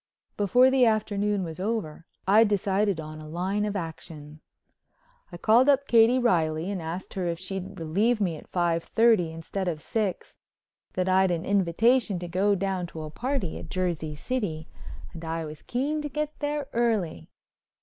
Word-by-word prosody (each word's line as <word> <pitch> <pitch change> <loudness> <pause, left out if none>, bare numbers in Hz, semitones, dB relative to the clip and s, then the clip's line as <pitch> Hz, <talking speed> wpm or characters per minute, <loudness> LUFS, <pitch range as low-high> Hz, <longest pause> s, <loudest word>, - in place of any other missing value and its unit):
Before 245 +6 +4
the 265 -1 +4
afternoon 210 -2 0
was 165 0 -6
over 190 -6 -3 0.2
I'd 215 +3 +6
decided 200 -2 +1
on 155 0 -7
a 155 - -10
line 190 +5 -1
of 210 -1 -3
action. 160 -3 -7 0.9
I 175 - -7
called 235 +9 +4
up 280 0 +3
Katie 230 +2 +5
Reilly 170 -7 +1
and 190 -3 -3
asked 165 +3 -6
her 185 -3 -2
if 170 -1 -2
she'd 190 +1 -6
relieve 205 +9 +1
me 180 -6 0
at 150 - -12
five 170 -2 0
thirty 220 -8 +3
instead 165 +4 -4
of 165 -3 -2
six—that 185 -1 -5
I'd 190 0 +4
an 175 0 -1
invitation 200 +3 +2
to 175 0 -5
go 195 +4 +2
down 190 -2 -2
to 160 -2 -8
a 155 - -7
party 245 - -2
at 160 - -10
Jersey 170 -4 -2
City 165 - -3 0.5
and 170 -1 -9
I 165 0 -3
was 150 0 -9
keen 285 +5 -2
to 295 - -4
get 300 +2 -3
there 290 0 -2
early. 215 - 0
190 Hz, 170 wpm, -27 LUFS, 165-225 Hz, 0.9 s, I'd